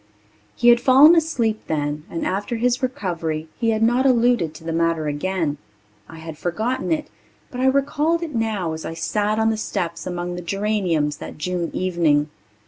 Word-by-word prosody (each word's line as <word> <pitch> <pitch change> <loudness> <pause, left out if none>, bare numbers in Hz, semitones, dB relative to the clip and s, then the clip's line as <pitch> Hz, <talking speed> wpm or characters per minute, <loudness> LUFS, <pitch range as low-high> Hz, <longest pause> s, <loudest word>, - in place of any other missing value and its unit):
He 240 - +4
had 240 0 +6
fallen 275 +7 +7
asleep 240 -10 0
then 150 -1 -2
and 165 - -4
after 205 +5 -2
his 245 +2 0
recovery 165 -10 -3
he 230 -2 +1
had 220 0 +1
not 240 +3 +3
alluded 240 - +3
to - - -12
the 165 0 -3
matter 165 -1 0
again. 150 0 -2 0.5
I 165 - -11
had 160 -1 -9
forgotten 220 - -2
it, 310 -2 0 0.4
but 250 - -4
I 260 - +3
recalled 290 +5 +1
it 320 -3 -5
now 215 -8 -1
as 160 - -6
I 165 - -5
sat 210 +5 -1
on 220 0 +2
the 220 - -2
steps 170 -5 -3
among 175 0 -3
the 180 - -5
geraniums 180 -6 -1
that - - -9
June 175 +2 -2
evening. 160 -5 +1
190 Hz, 180 wpm, -22 LUFS, 165-240 Hz, 0.5 s, fallen